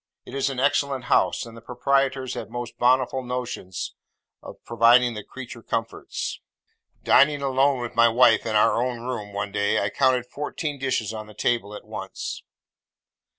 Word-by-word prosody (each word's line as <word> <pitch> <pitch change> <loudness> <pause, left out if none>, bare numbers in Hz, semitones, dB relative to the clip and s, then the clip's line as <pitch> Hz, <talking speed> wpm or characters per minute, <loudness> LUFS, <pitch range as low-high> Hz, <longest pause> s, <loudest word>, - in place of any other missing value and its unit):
It - - -11
is 135 0 0
an 135 -2 -4
excellent 140 -1 +1
house, - - +2
and 115 -1 -11
the 115 - -11
proprietors 130 +2 0
have - - -6
most 120 -1 -6
bountiful 130 +1 +3
notions 125 -7 -5 0.5
of - - -10
providing 120 +1 +4
the 105 -2 -6
creature 125 -1 -9
comforts. 115 0 -4 0.6
Dining 145 0 +4
alone 135 0 +2
with 120 - -5
my 115 0 +5
wife 115 -1 +5
in 110 - -1
our 115 +2 +4
own 125 -2 -3
room, 120 -4 -5
one 100 0 -4
day, 100 0 +1
I 100 0 -1
counted 130 -1 +2
fourteen 145 +2 -5
dishes 120 -5 -1
on 110 -1 -7
the 105 - -14
table 105 -2 -1
at - - -10
once. - - -6
125 Hz, 165 wpm, -24 LUFS, 115-130 Hz, 0.6 s, my